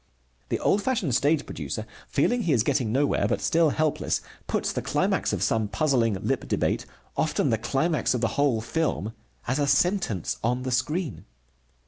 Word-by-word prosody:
The -, -, +1 dB
old 200 Hz, -, +2 dB
fashioned 205 Hz, -, 0 dB
stage 145 Hz, +4 st, +2 dB
producer, 110 Hz, -, -5 dB, 0.2 s
feeling 240 Hz, -, +1 dB
he 170 Hz, -8 st, +1 dB
is 115 Hz, -5 st, +3 dB
getting 130 Hz, -4 st, +1 dB
nowhere, 140 Hz, +4 st, +2 dB
but -, -, 0 dB
still 165 Hz, -1 st, +3 dB
helpless, 155 Hz, 0 st, 0 dB, 0.3 s
puts -, -, -1 dB
the -, -, -2 dB
climax -, -, 0 dB
of -, -, -1 dB
some 110 Hz, -2 st, +1 dB
puzzling 120 Hz, -5 st, +1 dB
lip -, -, -1 dB
debate, -, -, 0 dB, 0.3 s
often 150 Hz, -3 st, +1 dB
the 115 Hz, -, +1 dB
climax 135 Hz, +4 st, +1 dB
of 120 Hz, -, -2 dB
the 115 Hz, -, +2 dB
whole 140 Hz, -6 st, +2 dB
film, 115 Hz, -, -1 dB, 0.3 s
as 130 Hz, +4 st, 0 dB
a 145 Hz, -, +1 dB
sentence 175 Hz, -, +1 dB
on 125 Hz, +2 st, 0 dB
the 130 Hz, -, -3 dB
screen. 150 Hz, -, -1 dB
140 Hz, 170 wpm, -26 LUFS, 115-160 Hz, 0.3 s, is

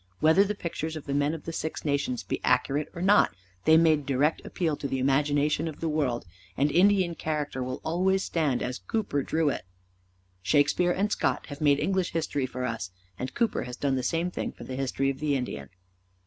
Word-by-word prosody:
Whether 160 Hz, +5 st, +5 dB
the 205 Hz, +1 st, -2 dB
pictures 160 Hz, -3 st, -4 dB
of 155 Hz, -, -7 dB
the 140 Hz, -, -3 dB
men 145 Hz, +2 st, +1 dB
of 160 Hz, -, -9 dB
the 165 Hz, -, -5 dB
Six 160 Hz, 0 st, -4 dB
Nations 140 Hz, -4 st, 0 dB
be -, -, -3 dB
accurate 145 Hz, +2 st, +1 dB
or 170 Hz, -, -4 dB
not 205 Hz, +2 st, +4 dB, 0.3 s
they 160 Hz, -, +7 dB
made 155 Hz, -3 st, +3 dB
direct 140 Hz, +3 st, +1 dB
appeal 165 Hz, -4 st, -1 dB
to 140 Hz, -, -3 dB
the 135 Hz, -, -2 dB
imagination 145 Hz, +3 st, +2 dB
of 155 Hz, -, -6 dB
the 165 Hz, -, -2 dB
world, 140 Hz, -8 st, 0 dB, 0.3 s
and 145 Hz, +2 st, +2 dB
Indian 185 Hz, +1 st, +4 dB
character 150 Hz, -5 st, -3 dB
will 130 Hz, 0 st, -3 dB
always 190 Hz, +4 st, +1 dB
stand 150 Hz, -7 st, 0 dB
as 125 Hz, +1 st, -3 dB
Cooper 210 Hz, -, -1 dB
drew 160 Hz, +2 st, +1 dB
it. -, -, -2 dB, 0.8 s
Shakespeare 145 Hz, -, +3 dB
and 200 Hz, +4 st, 0 dB
Scott -, -, 0 dB
have 145 Hz, +1 st, -8 dB
made 145 Hz, -2 st, +4 dB
English 190 Hz, -2 st, 0 dB
history 145 Hz, -5 st, -1 dB
for 125 Hz, 0 st, -4 dB
us, 115 Hz, -6 st, -3 dB, 0.3 s
and 130 Hz, -, -5 dB
Cooper 235 Hz, -2 st, +1 dB
has 125 Hz, 0 st, -7 dB
done 140 Hz, -2 st, 0 dB
the 130 Hz, -, 0 dB
same 170 Hz, +6 st, -1 dB
thing -, -, -3 dB
for -, -, -12 dB
the 130 Hz, -, -6 dB
history 135 Hz, +1 st, 0 dB
of 135 Hz, -, -9 dB
the 150 Hz, -2 st, +1 dB
Indian. 70 Hz, -, -4 dB
150 Hz, 205 wpm, -27 LUFS, 135-165 Hz, 0.8 s, they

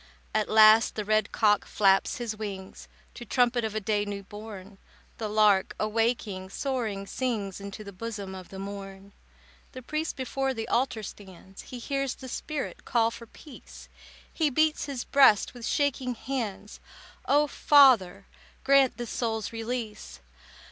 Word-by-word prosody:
At -, -, 0 dB
last 215 Hz, +1 st, +6 dB
the 210 Hz, -, -3 dB
red 215 Hz, 0 st, +1 dB
cock 210 Hz, -2 st, +3 dB
flaps 195 Hz, -2 st, +2 dB
his 235 Hz, -3 st, -4 dB
wings 195 Hz, -3 st, -7 dB, 0.3 s
To 240 Hz, -, -9 dB
trumpet 240 Hz, +1 st, +1 dB
of 220 Hz, -1 st, -3 dB
a -, -, +1 dB
day 210 Hz, 0 st, 0 dB
new 200 Hz, -1 st, -5 dB
born. 205 Hz, -1 st, -10 dB, 0.4 s
The 220 Hz, -2 st, -3 dB
lark, 210 Hz, -2 st, +3 dB
awaking, 215 Hz, -3 st, -1 dB
soaring 220 Hz, -4 st, -3 dB
sings 205 Hz, -5 st, -3 dB
Into 200 Hz, +1 st, -8 dB
the 200 Hz, -1 st, -10 dB
bosom 205 Hz, -1 st, -6 dB
of 185 Hz, -1 st, -10 dB
the 190 Hz, -, -9 dB
morn. 195 Hz, 0 st, -8 dB, 0.6 s
The 255 Hz, -, -9 dB
priest 305 Hz, +5 st, -3 dB
before 265 Hz, 0 st, -2 dB
the 225 Hz, 0 st, -4 dB
altar 245 Hz, -3 st, 0 dB
stands, 190 Hz, -1 st, -11 dB
He 250 Hz, -, -9 dB
hears 275 Hz, +1 st, -2 dB
the 260 Hz, -, -10 dB
spirit 300 Hz, +3 st, -5 dB
call 230 Hz, -1 st, +1 dB
for 230 Hz, 0 st, -10 dB
peace; 290 Hz, +4 st, -14 dB, 0.4 s
He 315 Hz, -3 st, +1 dB
beats 310 Hz, +3 st, +1 dB
his 275 Hz, -4 st, -4 dB
breast 265 Hz, -8 st, +4 dB
with 240 Hz, -2 st, -7 dB
shaking 265 Hz, -3 st, 0 dB
hands. 220 Hz, -5 st, -5 dB, 0.5 s
"O 295 Hz, +1 st, +4 dB
Father, 250 Hz, -11 st, +4 dB, 0.4 s
grant 275 Hz, -1 st, +4 dB
this 240 Hz, -2 st, -5 dB
soul's 225 Hz, -2 st, -2 dB
release. 225 Hz, -, -5 dB
220 Hz, 150 wpm, -27 LUFS, 200-255 Hz, 0.6 s, last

